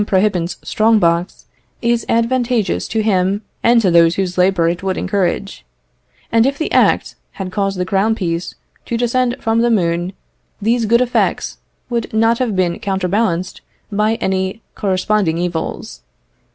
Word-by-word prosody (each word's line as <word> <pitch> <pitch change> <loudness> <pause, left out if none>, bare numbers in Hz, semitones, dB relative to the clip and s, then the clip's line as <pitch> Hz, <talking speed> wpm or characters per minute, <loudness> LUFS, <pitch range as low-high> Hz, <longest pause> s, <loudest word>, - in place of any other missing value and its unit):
Prohibant's 190 -3 0
strong 220 +1 +3
box, 170 -2 0 0.3
is 235 -1 0
advantageous 230 -3 0
to 220 - -1
him 195 0 +1 0.2
and 235 0 +4
to 185 - +3
those 170 0 +5
whose 185 -2 -2
labour 180 -2 +3
it 170 +1 -1
would 190 -1 -2
encourage; 195 0 -2 0.7
and 230 +2 +4
if 275 +1 -1
the 315 - -3
Act - - +2 0.2
had 190 -2 -6
caused 195 -1 -1
the 180 - -1
crown 200 +4 +1
piece 170 -4 -3 0.3
to 235 - -1
descend 245 +1 +1
from 225 0 +1
the 240 - +2
moon, 175 -3 0 0.5
these 225 +2 +1
good 235 +3 +4
effects 250 -1 0 0.3
would 235 -2 -3
not 225 +1 +2
have 240 -6 -1
been 175 -2 0
counterbalanced 190 -1 -1 0.3
by 210 +2 +1
any 190 -1 -2
corresponding 190 -3 0
evils. 170 - -4
200 Hz, 150 wpm, -17 LUFS, 180-230 Hz, 0.7 s, those